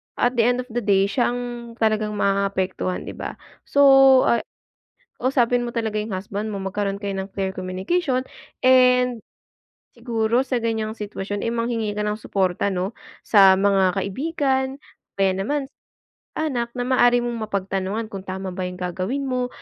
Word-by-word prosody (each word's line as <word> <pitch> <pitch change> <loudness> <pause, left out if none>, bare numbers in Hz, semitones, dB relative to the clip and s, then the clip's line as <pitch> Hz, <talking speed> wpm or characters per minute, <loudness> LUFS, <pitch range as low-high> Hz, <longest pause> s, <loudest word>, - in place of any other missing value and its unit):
at 245 +1 +1
the - - +6
end 245 0 +2
of - - -22
the 240 - -1
day, 200 -4 +3
siya 225 +6 +1
ang 240 -1 -6
talagang 215 -2 0
maapektuhan, 195 -2 -1
'di - - -7
ba? - - -5 0.3
So, 285 - +4 0.4
ah 235 - +3 0.8
kausapin 245 -1 +1
mo 240 - -4
talaga 225 -2 -2
yung 215 +1 -2
husband 200 +3 -4
mo, 200 - -4
magkaroon 195 +1 -2
kayo 200 -1 -3
ng 190 0 -5
clear 190 -1 -3
communication, 215 - -1 0.4
and 250 -2 +4 0.7
siguro 235 +1 0
sa 255 -2 -1
ganiyang 220 -1 -1
sitwasyon 205 -2 -5
ay - - -2
manghingi 230 -2 -2
ka 210 - -1
ng 210 +1 -2
suporta, 190 -1 0
'no? 190 +1 -2 0.3
Sa 195 -3 +6
mga 195 -1 +2
kaibigan, 265 - -1 0.4
kaya 195 -1 +3
naman 245 +10 -1 0.7
anak, 245 -7 -2
na 245 - -1
maaari 245 -1 +4
mong 235 -2 -3
mapagtanungan 195 +2 -2
kung 195 -1 -6
tama 190 0 -5
ba 185 0 -4
yung 180 - -8
gagawin 185 +10 -2
mo, 250 -2 -1
215 Hz, 160 wpm, -22 LUFS, 195-245 Hz, 0.8 s, the